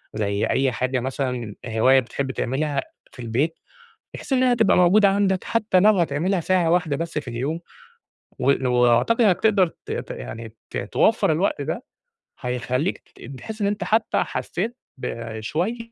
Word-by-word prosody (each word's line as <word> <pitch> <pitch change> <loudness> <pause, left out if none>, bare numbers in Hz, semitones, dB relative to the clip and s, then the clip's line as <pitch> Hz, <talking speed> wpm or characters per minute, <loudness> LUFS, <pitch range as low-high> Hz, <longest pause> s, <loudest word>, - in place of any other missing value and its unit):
زي 100 -1 0
أي 135 -1 +1
حاجة 125 +2 -1
مثلًا 125 -4 -3
هواية 120 +4 +4
بتحب 130 +2 -3
تعملها 140 +4 -1 0.3
في 125 - -11
البيت 130 +8 -1 0.6
بحيث 275 - -7
إنّها 255 -1 +4
تبقى 225 -4 +3
موجودة 195 +3 +5
عندك 195 -1 +1
حتّى 215 -5 +2
لو 210 -1 +5
هتعملها 170 +4 +1
ساعة 175 -1 +2
واحدة 165 -5 +1
بس 165 -1 -3
في 140 - -6
اليوم 135 +8 -3 0.8
و 135 0 +2
وأعتقد 125 - +3
إنّك 185 -4 +3
تقدر 200 -4 +4
ت - - -12
ت - - -4
يعني 110 - -8 0.2
ت - - -3
توفَّر 190 - +2
الوقت 160 -2 0
ده، 160 - -3 0.6
هيخلّيك 125 +6 -1
تت 130 +2 -12
تحِس 220 - -8
إن - - +2
أنت 205 +1 -1
حتّى 220 +1 +1
حسّيت 225 +7 -4 0.2
بشوية 115 - -3
150 Hz, 155 wpm, -23 LUFS, 125-195 Hz, 0.8 s, موجودة